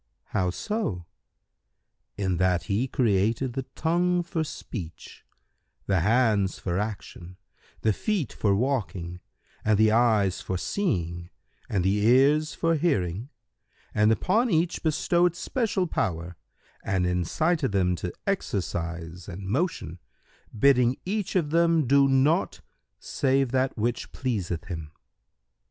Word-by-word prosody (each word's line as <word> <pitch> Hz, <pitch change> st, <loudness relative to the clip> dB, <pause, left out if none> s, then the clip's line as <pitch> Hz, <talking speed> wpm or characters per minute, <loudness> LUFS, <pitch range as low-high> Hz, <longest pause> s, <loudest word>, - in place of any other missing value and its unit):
Q -, -, -50 dB, 0.2 s
"How 90 Hz, -1 st, +1 dB
so?"—"In 95 Hz, -, -6 dB
that 90 Hz, -2 st, +2 dB
He 100 Hz, +8 st, 0 dB
created 115 Hz, +1 st, +1 dB
the 135 Hz, 0 st, -4 dB
Tongue 175 Hz, +2 st, +1 dB
for 170 Hz, -1 st, -2 dB
speech, 95 Hz, -, -8 dB, 0.6 s
the 95 Hz, -3 st, +2 dB
Hands 105 Hz, 0 st, +2 dB
for 90 Hz, 0 st, -2 dB
action, 95 Hz, -4 st, -6 dB, 0.4 s
the 110 Hz, -, +2 dB
Feet 195 Hz, -, -2 dB
for 100 Hz, -2 st, +1 dB
walking 95 Hz, -, -2 dB, 0.4 s
and 110 Hz, -1 st, +3 dB
the 110 Hz, 0 st, +4 dB
Eyes 110 Hz, -5 st, +3 dB
for 95 Hz, -, -3 dB
seeing 85 Hz, -, -2 dB, 0.4 s
and 95 Hz, -4 st, 0 dB
the 95 Hz, +2 st, +2 dB
Ears 140 Hz, +6 st, +4 dB
for 165 Hz, 0 st, +1 dB
hearing, 120 Hz, -, 0 dB, 0.6 s
and 105 Hz, +1 st, +4 dB
upon 215 Hz, -, +2 dB
each 170 Hz, -1 st, +1 dB
bestowed 170 Hz, +2 st, +2 dB
especial 205 Hz, 0 st, -1 dB
power 90 Hz, -, -2 dB, 0.5 s
and 95 Hz, -2 st, 0 dB
incited 135 Hz, -, 0 dB
them 90 Hz, -2 st, +2 dB
to 90 Hz, -, -4 dB
exercise 85 Hz, -, -3 dB
and 95 Hz, +1 st, -7 dB
motion, 100 Hz, -, -2 dB, 0.6 s
bidding 125 Hz, 0 st, +4 dB
each 200 Hz, +1 st, -2 dB
of 160 Hz, -5 st, +1 dB
them 165 Hz, -2 st, +3 dB
do 140 Hz, +2 st, +5 dB
naught 135 Hz, +6 st, +2 dB, 0.4 s
save 135 Hz, -2 st, 0 dB
that 130 Hz, 0 st, 0 dB
which 120 Hz, +2 st, -2 dB
pleaseth 95 Hz, -10 st, -3 dB
Him. 80 Hz, -5 st, -7 dB
110 Hz, 120 wpm, -26 LUFS, 90-155 Hz, 0.6 s, do